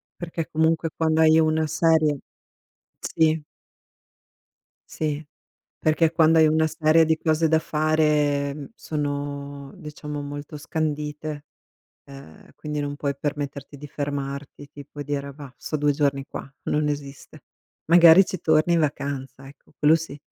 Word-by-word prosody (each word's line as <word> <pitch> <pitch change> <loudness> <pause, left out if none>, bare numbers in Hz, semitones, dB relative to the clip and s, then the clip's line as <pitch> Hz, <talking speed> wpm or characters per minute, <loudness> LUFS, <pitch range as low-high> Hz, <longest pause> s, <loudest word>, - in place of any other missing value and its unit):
Perché 165 -2 -5
comunque 160 +1 +1
quando 160 0 +2
hai 160 0 +6
una 155 0 +2
serie 160 -1 +2 0.8
sì. 160 -1 +1 1.5
Sì, 155 -1 -3 0.5
perché 160 +1 +2
quando 165 -1 +4
hai 160 - +7
una 160 +1 +2
serie 160 0 +3
di 160 0 +1
cose 160 0 +1
da 160 0 +3
fare, 150 -2 +1
mhmm, 145 -2 -8
sono, 145 -1 -5
diciamo 150 -1 -7
molto 145 +1 -7
scandite, 150 0 -4 0.6
ehm, 135 - -14
quindi 150 -1 -5
non 145 0 -3
puoi 140 -1 -2
permetterti 145 -1 -5
di 145 - -9
fermarti, 140 0 -5
tipo 145 0 -9
dire: 140 -1 -4
"Bah, 140 -2 -11
sto 155 - -4
2 145 0 +2
giorni 140 -1 0
qua", - - -8
non 150 0 0
esiste. 140 -2 -6 0.5
Magari 170 +2 +8
ci 185 - -5
torni 155 +2 +3
in 170 - +3
vacanza, 140 -3 -3
ecco, 140 0 -18
quello 155 +2 +5
sì. 155 -3 -5
150 Hz, 135 wpm, -24 LUFS, 145-160 Hz, 1.5 s, Magari